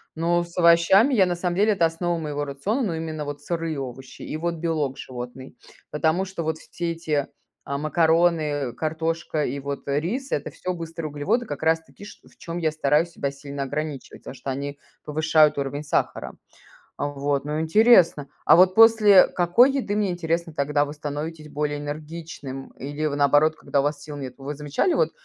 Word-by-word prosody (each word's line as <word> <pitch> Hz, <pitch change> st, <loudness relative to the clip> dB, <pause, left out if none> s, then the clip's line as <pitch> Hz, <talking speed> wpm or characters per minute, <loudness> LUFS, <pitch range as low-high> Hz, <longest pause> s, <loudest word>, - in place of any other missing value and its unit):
Но 170 Hz, +1 st, +1 dB
с 170 Hz, +1 st, -14 dB
овощами 175 Hz, +9 st, +5 dB
я, 200 Hz, -6 st, +5 dB
на 180 Hz, -1 st, -1 dB
самом 175 Hz, 0 st, -2 dB
деле- 210 Hz, +3 st, +3 dB
это 180 Hz, -4 st, +2 dB
основа 170 Hz, +1 st, -1 dB
моего 145 Hz, -2 st, -3 dB
рациона, 145 Hz, -, -2 dB
но 185 Hz, -8 st, -1 dB
именно 160 Hz, -1 st, -4 dB
вот 145 Hz, 0 st, -6 dB
сырые 165 Hz, -2 st, -3 dB
овощи 130 Hz, 0 st, -8 dB
и -, -, -5 dB
вот 170 Hz, +1 st, -2 dB
белок 155 Hz, -5 st, -2 dB
животный. 130 Hz, 0 st, -8 dB, 0.4 s
Потому 160 Hz, +5 st, +1 dB
что 190 Hz, -3 st, -5 dB
вот 160 Hz, 0 st, -2 dB
все 170 Hz, +1 st, -5 dB
эти, 155 Hz, -4 st, -2 dB, 0.4 s
а, 140 Hz, -, -3 dB
макароны, 155 Hz, -3 st, +1 dB
картошка 160 Hz, +2 st, -2 dB
и 140 Hz, +3 st, -3 dB
вот, 140 Hz, +1 st, -6 dB
э, 140 Hz, +1 st, +1 dB
рис- 255 Hz, -, -4 dB
это 145 Hz, -, -1 dB
всё 185 Hz, -, -4 dB
быстрые 165 Hz, -2 st, -6 dB
углеводы, 150 Hz, +12 st, -1 dB
как 145 Hz, -6 st, -6 dB
раз 160 Hz, 0 st, +3 dB
таки 200 Hz, -, -14 dB
ш 210 Hz, -, -12 dB
в -, -, -23 dB
чём 170 Hz, 0 st, -6 dB
я 160 Hz, -3 st, 0 dB
стараюсь 155 Hz, +2 st, +1 dB
себя 140 Hz, -4 st, -3 dB
сильно 140 Hz, 0 st, -6 dB
ограничивать. 150 Hz, 0 st, -5 dB
Потому -, -, -8 dB
что 135 Hz, +1 st, -7 dB
они 140 Hz, +2 st, -4 dB, 0.3 s
повышают 155 Hz, 0 st, +3 dB
уровень 140 Hz, +1 st, -3 dB
сахара. 145 Hz, -, -2 dB, 0.6 s
Вот, 145 Hz, -1 st, -1 dB
ну 150 Hz, +1 st, -2 dB
интересно. 170 Hz, -, +4 dB, 0.2 s
А -, -, +7 dB
вот 185 Hz, +1 st, +5 dB
после 220 Hz, -3 st, +7 dB
какой 180 Hz, +10 st, +4 dB
еды, 250 Hz, -7 st, -2 dB
мне 210 Hz, -2 st, +1 dB
интересно, 170 Hz, -1 st, -2 dB
тогда 145 Hz, 0 st, +1 dB
вы 145 Hz, -, -7 dB
становитесь 150 Hz, +1 st, -6 dB
более 145 Hz, 0 st, -2 dB
энергичным 145 Hz, -2 st, -7 dB
или, 145 Hz, +3 st, -3 dB
вы 145 Hz, -, -2 dB
наоборот, 145 Hz, +2 st, +4 dB
когда 140 Hz, -, 0 dB
у -, -, 0 dB
вас 145 Hz, 0 st, -2 dB
сил 150 Hz, -1 st, -8 dB
нету? 135 Hz, -1 st, -8 dB
Вы 145 Hz, +2 st, -4 dB
замечали 150 Hz, -, 0 dB
вот? 485 Hz, -, +2 dB
155 Hz, 190 wpm, -24 LUFS, 145-170 Hz, 0.6 s, А